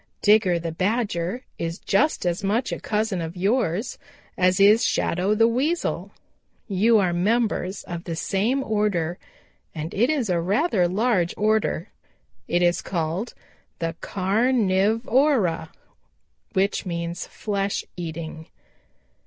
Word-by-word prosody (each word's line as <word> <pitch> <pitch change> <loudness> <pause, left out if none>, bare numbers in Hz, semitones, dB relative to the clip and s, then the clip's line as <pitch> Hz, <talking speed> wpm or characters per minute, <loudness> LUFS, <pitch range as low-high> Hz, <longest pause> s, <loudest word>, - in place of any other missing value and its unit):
Digger 205 -4 +4
the 165 0 -4
Badger 195 +3 -1 0.2
is 165 +1 -3
just 275 +2 +1
as 175 +3 -1
much 220 +5 0
a - - -3
cousin 210 -4 -1
of 165 +2 -6
yours 200 +1 0 0.4
as 185 0 +2
is 210 +4 +6
Shadow 190 +2 +1
the 225 +1 +5
Weasel. 285 +9 -1 0.6
You 220 +3 +3
are 185 -4 +2
members 205 0 0
of 170 0 -7
the 170 - -3
same 215 +11 0
order 205 -7 0 0.6
and 155 +2 -5
it 235 +6 +2
is 285 -7 0
a 175 -3 +1
rather 200 - +2
large 190 -2 +1
order. 215 -3 +1 0.6
It 175 +1 +1
is 175 0 +2
called 175 +5 -3 0.4
the 165 0 -2
Car 200 +4 0
niv 220 -3 +2
o 280 +5 +4
ra, 165 -8 -1 0.9
which 195 0 +1
means 170 -1 -4
'flesh 200 -1 -2
eating.' 160 -2 -6
195 Hz, 130 wpm, -24 LUFS, 175-225 Hz, 0.9 s, is